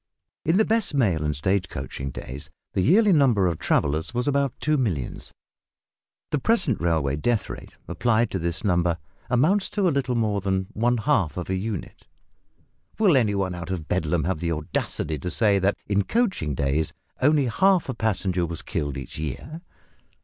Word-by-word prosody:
In 165 +4 +2
the 220 - +4
best 220 -8 0
mail 95 - +2
and 75 0 -1
stage 95 +6 0
coaching 70 0 -5
days 65 +1 -7 0.2
the - - +1
yearly 200 - +5
number 125 - +4
of 85 -3 0
travellers 80 +9 0
was 125 +3 0
about 140 -2 +2
two 155 0 +1
millions. 95 - -2 1.0
The 150 - +1
present 175 - +1
railway 80 -5 +1
death 115 +8 0
rate - - -10
applied 115 -1 +1
to 95 - -1
this 85 +5 -3
number 85 -4 +2 0.3
amounts 155 +11 +2
to 200 -3 +1
a - - +3
little 130 -3 0
more 105 -3 0
than 95 -1 0
one 120 +3 +1
half 110 - +1
of 90 +1 -4
a - - +1
unit! 100 -1 -5 0.9
Will 205 -8 +4
any 110 -6 +3
one 95 -2 -1
out 90 0 -6
of 85 -5 -4
Bedlam 80 -2 0
have 90 -3 -1
the 85 0 -1
audacity 75 0 -3
to 90 - -4
say 100 0 +3
that 95 +2 +1
in 100 0 +1
coaching 190 - 0
days 70 +4 0 0.3
only 145 +1 +4
half 185 - +3
a 130 - -2
passenger 95 -6 0
was 85 -1 -4
killed 70 -2 -3
each 65 +2 -6
year? 80 - -5
100 Hz, 180 wpm, -25 LUFS, 80-135 Hz, 1.0 s, yearly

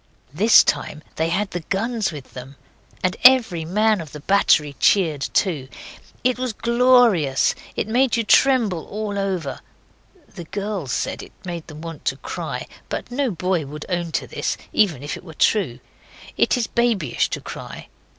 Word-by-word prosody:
This 210 +8 +6
time 155 - -2
they 160 +1 +1
had 195 +4 -1
the 175 - -3
guns 215 +5 -2
with 145 -4 -10
them. 130 +2 -9 0.5
And 185 0 +1
every 235 -11 +6
man 210 +3 +2
of 155 - -10
the 150 - -7
battery 150 -4 +2
cheered 160 -8 +3
too. 155 -9 0 0.6
It 250 0 +1
was 255 -3 -2
glorious. 235 - +3 0.2
It - - -2
made 245 +2 +2
you 230 - +1
tremble 225 -8 +3
all 205 -1 -4
over. 185 -8 -2 0.7
The 175 -4 -10
girls 200 -6 -4
said - - -2
it - - -13
made 170 -2 -6
them 155 0 -10
want 165 -1 -8
to - - 0
cry - - -5 0.2
but - - -5
no 270 +1 0
boy 180 -5 -1
would 150 +2 -8
own 175 -2 -2
to - - -1
this, - - -3 0.2
even 170 - +2
if 145 - -4
it - - -11
were 160 -4 -12
true. 150 - +1 0.6
It - - +2
is 240 - 0
babyish 225 - 0
to - - -3
cry. - - -9
190 Hz, 170 wpm, -22 LUFS, 155-220 Hz, 0.7 s, This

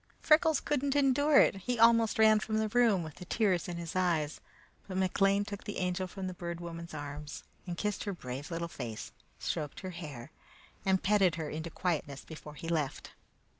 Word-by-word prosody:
Freckles 315 -1 +4
could 295 -3 -1
not 280 0 0
endure 285 +1 +5
it. - - +4
He 240 +6 -2
almost 230 -1 +5
ran 220 -1 +6
from 215 0 -2
the 220 0 +1
room, 225 -6 +3
with 155 -2 -9
the 180 - -9
tears 185 -3 +1
in 175 -1 -4
his 170 0 -6
eyes; 165 -5 0 0.5
but 185 -1 -4
McLean 195 +2 +2
took 205 0 -7
the 205 - -4
Angel 180 0 -1
from 190 +1 -6
the 185 - -3
Bird 170 -1 -5
Woman's 170 -1 -7
arms, 145 0 -6 0.2
and 175 -1 -4
kissed 210 +1 -2
her 205 - -1
brave 135 -3 -6
little 170 0 -3
face, 115 -9 -6 0.3
stroked 150 -2 -3
her 185 -1 -5
hair, 150 -9 -8 0.6
and 190 -1 +3
petted 195 -4 +4
her 160 -2 -4
into 160 +2 -4
quietness 155 -6 -2
before 150 -1 -10
he 165 - -7
left. 155 -5 -2
180 Hz, 195 wpm, -32 LUFS, 160-210 Hz, 0.6 s, ran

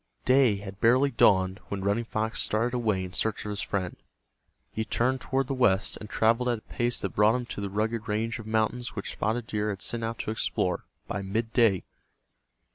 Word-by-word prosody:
Day 130 -4 +5
had 100 0 -8
barely 130 +5 +4
dawned 95 -4 +4
when 100 -1 -4
Running 100 +4 +1
Fox 110 0 -1
started 115 +3 0
away 110 -6 0
in 90 0 -7
search 110 -1 -1
of 105 - -3
his 105 0 -2
friend. 95 -4 -2 0.8
He 110 - -2
turned 130 +4 0
toward 135 0 0
the 135 - -3
west, 105 -7 +2
and 105 - -9
traveled 115 +3 +2
at 120 - +1
a - - -13
pace 120 +1 -1
that 100 - -1
brought 105 +3 +4
him 125 -1 -2
to 105 - -6
the 100 - -3
rugged 110 +3 -1
range 115 +2 -1
of 110 - -9
mountains 110 +2 0
which 100 - -4
Spotted 115 +2 -1
Deer 105 -2 -1
had 100 -2 -3
set 120 +3 0
out 115 0 -3
to - - -3
explore, 110 - -1 0.2
by 100 - -3
midday. 110 0 +1
110 Hz, 200 wpm, -28 LUFS, 100-120 Hz, 0.8 s, Day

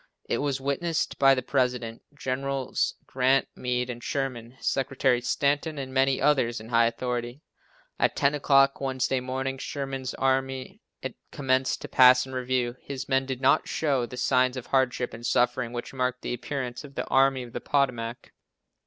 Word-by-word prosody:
It - - 0
was 140 -2 -1
witnessed 140 +5 -1
by 135 -1 +6
the 130 - -2
President, 125 -4 -1
Generals 135 0 -2
Grant, 130 +1 +2
Meade, 125 0 -1
and 120 0 -9
Sherman, 130 -3 -3
Secretary 130 -2 +1
Stanton, 145 +5 0
and 130 -1 -5
many 135 0 +3
others 135 -5 +2
in 110 +1 -11
high 115 -1 +4
authority. 120 +3 -4 0.6
At - - +2
ten 140 +1 +2
o'clock, 140 -1 +3
Wednesday 130 -1 0
morning, 130 +1 -3
Sherman's 135 -2 -4
army 135 -1 -1 0.5
commenced 130 -1 0
to - - -6
pass 125 0 +6
in 130 - -10
review. 125 -1 -1
His 140 -1 -6
men 135 0 +1
did 130 -1 -4
not 135 - +3
show 135 -6 0
the 125 - -9
signs 130 0 +2
of 125 - -6
hardship 130 -2 0
and 115 - -9
suffering 120 0 +1
which 120 +2 -6
marked 125 -1 -2
the - - -2
appearance 125 0 -4
of 140 -2 -12
the - - -2
Army 135 -1 +3
of 120 -1 -11
the - - -4
Potomac. 125 -4 -1
130 Hz, 165 wpm, -27 LUFS, 125-135 Hz, 0.6 s, by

